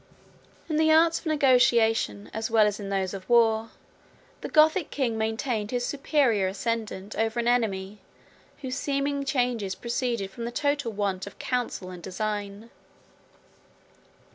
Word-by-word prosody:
] - - -30
In 310 - -1
the 315 0 +4
arts 325 +1 +4
of - - -9
negotiation, 235 - +3
as 220 +1 -3
well 220 -2 +5
as 210 0 -1
in 200 -1 -6
those 195 -1 -1
of 190 -1 -8
war, 225 -1 +3 0.7
the - - -5
Gothic 315 +2 +4
king 255 -5 -1
maintained 220 0 -2
his 245 0 -1
superior 270 -8 +1
ascendant 210 0 -3
over 225 +1 0
an 235 - -1
enemy, 210 -4 0 0.6
whose 255 -1 -3
seeming 280 0 -1
changes 245 -8 -1
proceeded 235 -4 -2
from 235 +2 -6
the 235 - -4
total 285 -2 -1
want 200 -2 -2
of 200 - -11
counsel 245 -7 -3
and 180 -1 -9
design. 205 +3 -4
230 Hz, 145 wpm, -26 LUFS, 205-260 Hz, 0.7 s, well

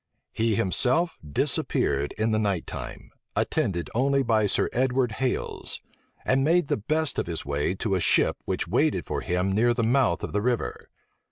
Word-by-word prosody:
He 110 -1 +1
himself 130 - +2
disappeared 70 -1 0
in 110 +1 +1
the 110 - +2
night 100 -5 0
time, - - -8 0.2
attended 85 -4 0
only 135 +3 +2
by 110 -3 +2
Sir - - +1
Edward 125 -1 +1
Hales; 125 +3 -2 0.5
and 135 +1 +2
made 165 +1 +2
the - - +1
best 155 +7 -1
of - - -2
his 85 -2 -4
way 70 +6 -1
to 100 +1 -2
a 95 - +2
ship 85 - +3
which - - -2
waited - - +1
for - - -3
him 90 +2 0
near 120 +4 +3
the 115 - 0
mouth 120 -5 +2
of - - -4
the 105 - +1
river. 120 - -2
110 Hz, 175 wpm, -26 LUFS, 90-130 Hz, 0.5 s, ship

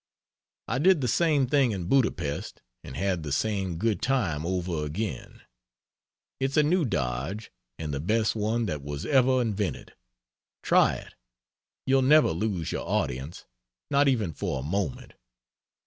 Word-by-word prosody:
I 125 - -1
did 180 +2 +5
the 125 - 0
same 150 +1 +2
thing 135 -1 +3
in 95 -3 -4
Budapest 95 - -1 0.2
and 65 - -9
had 95 -1 0
the 75 -2 -5
same 95 +2 -1
good 110 +3 0
time 90 - 0
over 90 -4 -2
again. 75 - -5 1.0
It's 135 +2 -1
a 150 - +6
new 170 +2 +2
dodge, 95 - -3 0.3
and 75 -2 -4
the 70 - -2
best 110 +8 +1
one 110 +2 0
that 75 -8 -3
was 70 +1 -5
ever 130 -2 +4
invented. 105 -5 -2 0.7
Try - - +4
it. - - -10 0.7
You'll 135 0 +3
never 150 - +5
lose 90 -1 -2
your - - -4
audience 65 +7 -2 0.5
not 140 0 +4
even 110 - +1
for 70 -1 -3
a - - -6
moment. 85 -1 -3
105 Hz, 145 wpm, -27 LUFS, 80-130 Hz, 1.0 s, a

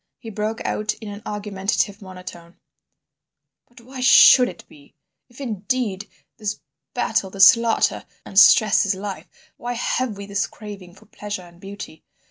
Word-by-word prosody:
He 225 - -10
broke 215 +2 -4
out 215 0 -2
in 215 -1 -10
an 205 +1 -9
argumentative 205 0 -2
monotone: 180 -2 -11 1.1
"But 240 0 -19
why 255 +2 -11
should 255 0 +7
it - - -13
be? 140 -1 -20 0.3
If, 245 - -17
indeed, 215 -4 -3 0.3
this 210 -1 -4 0.4
battle, 190 - -1
this 195 0 +7
slaughter 230 -2 +1 0.2
and 195 - +2
stress 215 0 +6
is 200 -1 0
life, 195 0 -7 0.3
why 245 0 -5
have 240 -2 -2
we 200 - -7
this 200 0 -2
craving 200 -5 -11
for - - -19
pleasure 205 -3 -7
and 175 0 -18
beauty? 195 -5 -10
205 Hz, 150 wpm, -21 LUFS, 195-225 Hz, 1.1 s, should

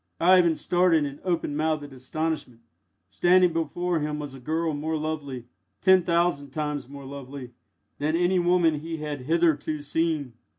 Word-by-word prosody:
Ivan 175 -1 +5
started 175 -2 +2
in 140 0 -6
open 170 -5 -1
mouthed 155 -2 -1
astonishment. 140 -2 -4 0.5
Standing 175 - +4
before 165 +2 -1
him 150 0 -2
was 145 -2 -6
a 135 - -10
girl 160 +4 -1
more 155 +2 -2
lovely 150 -5 -4 0.3
ten 190 -1 +5
thousand 170 -4 +1
times 145 -2 -3
more 140 -1 -10
lovely 135 -2 -8 0.5
than 155 +3 0
any 180 +2 +2
woman 175 -3 +3
he 165 +2 -5
had 150 -4 -5
hitherto 155 -2 +1
seen. 150 -3 -1
155 Hz, 145 wpm, -26 LUFS, 145-170 Hz, 0.5 s, Ivan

